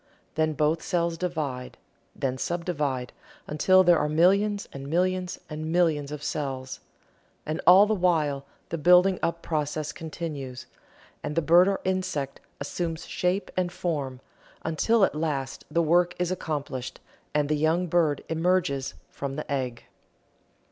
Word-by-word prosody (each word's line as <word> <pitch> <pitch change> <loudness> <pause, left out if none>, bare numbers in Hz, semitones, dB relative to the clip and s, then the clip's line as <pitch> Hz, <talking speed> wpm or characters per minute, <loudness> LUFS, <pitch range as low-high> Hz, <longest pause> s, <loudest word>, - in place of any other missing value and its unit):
Then 155 0 +1
both 155 +3 +1
cells 170 -2 0
divide 155 -8 -3 0.4
then 130 -1 -2
subdivide 150 -8 -2 0.3
until 185 +5 +4
there 175 -3 +5
are 150 - 0
millions 200 +6 +3
and 135 0 -7
millions 180 +3 0
and 155 +1 -5
millions 160 -5 +2
of 150 -1 -6
cells. 135 -4 -3 0.7
And 155 +1 -3
all 190 +3 +9
the 215 - +1
while 155 -8 +1 0.2
the 165 - -3
building 180 +3 +5
up 170 0 -1
process 150 -1 -2
continues, 150 -6 -6 0.6
and 150 - -4
the 165 - +3
bird 175 +4 +6
or 200 -1 0
insect 185 -7 -2 0.2
assumes 165 +3 -3
shape 180 +3 -1
and 180 -1 0
form, 140 -8 -3 0.4
until 195 +7 +3
at - - -3
last 150 -4 -3
the 170 +2 +2
work 175 +2 +3
is 180 0 -1
accomplished 140 -7 -4 0.4
and 150 -1 +2
the 155 - +1
young 160 +4 +2
bird 165 -4 +1
emerges 160 -5 0 0.2
from 140 -1 -5
the 150 -1 -6
egg. 125 -4 -2
160 Hz, 140 wpm, -27 LUFS, 145-180 Hz, 0.7 s, all